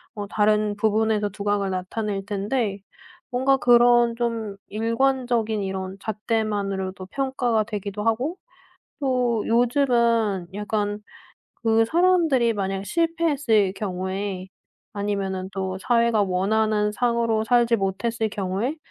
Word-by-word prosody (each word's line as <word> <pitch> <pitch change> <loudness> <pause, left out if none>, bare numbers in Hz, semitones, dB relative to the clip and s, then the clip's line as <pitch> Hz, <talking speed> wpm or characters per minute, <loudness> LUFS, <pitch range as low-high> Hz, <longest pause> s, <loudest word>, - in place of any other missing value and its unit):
어 205 -1 -5
다른 210 0 +1
부분에서 215 -1 +1
두각을 200 0 -1
나타낼 195 +2 -3
텐데 205 0 -2 0.5
뭔가 265 +2 +3
그런 240 -1 +5
좀 230 -4 -2
일관적인 230 -1 0
이런 190 0 -4
잣대만으로도 200 -3 -2
평가가 250 -3 0
되기도 210 -1 -5
하고 250 +11 0 0.6
또 250 -5 +1
요즘은 235 -6 +2
약간 210 0 -2 0.6
그 225 0 +3
사람들이 325 -8 +3
만약 195 -1 -3
실패했을 295 - +1
경우에 190 -1 -4 0.4
아니면은 195 -2 -2
또 190 -1 -3
사회가 235 -2 +2
원하는 210 +3 +1
상으로 230 -2 +1
살지 240 -1 +3
못했을 220 +3 -1
경우에 205 - -2
220 Hz, 260 characters per minute, -24 LUFS, 200-240 Hz, 0.6 s, 그런